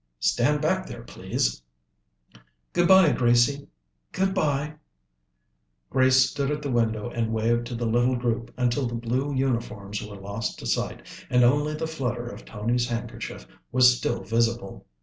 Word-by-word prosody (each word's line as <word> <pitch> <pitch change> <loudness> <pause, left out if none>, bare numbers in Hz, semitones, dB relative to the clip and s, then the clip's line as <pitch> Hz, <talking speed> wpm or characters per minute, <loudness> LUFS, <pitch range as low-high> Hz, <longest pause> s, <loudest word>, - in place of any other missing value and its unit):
"Stand 145 - +2
back 185 +4 +1
there, 115 - -8
please." - - -2 1.1
"Good 175 - +3
bye, 190 -4 +7
Gracie!" 120 +3 +2 0.4
"Good 190 +1 0
bye." 150 -4 0 1.2
Grace 130 0 +5
stood 140 -1 -2
at 150 0 -2
the 140 - -2
window 115 -1 0
and 115 -2 -1
waved 115 +1 +1
to 120 - -5
the 120 0 -2
little 120 +3 +2
group 120 -1 -2
until 125 +1 +1
the 120 - -4
blue 125 +5 -1
uniforms 115 -6 -2
were 105 -1 -8
lost 100 +3 -5
to - - -9
sight - - -2 0.2
and 125 0 +4
only 145 +5 +3
the 160 - -3
flutter 125 -7 -3
of 120 - -9
Tony's 120 +3 -1
handkerchief 120 -1 -5 0.3
was 125 -1 +6
still - - -2
visible. 115 - -1
120 Hz, 150 wpm, -25 LUFS, 115-140 Hz, 1.2 s, bye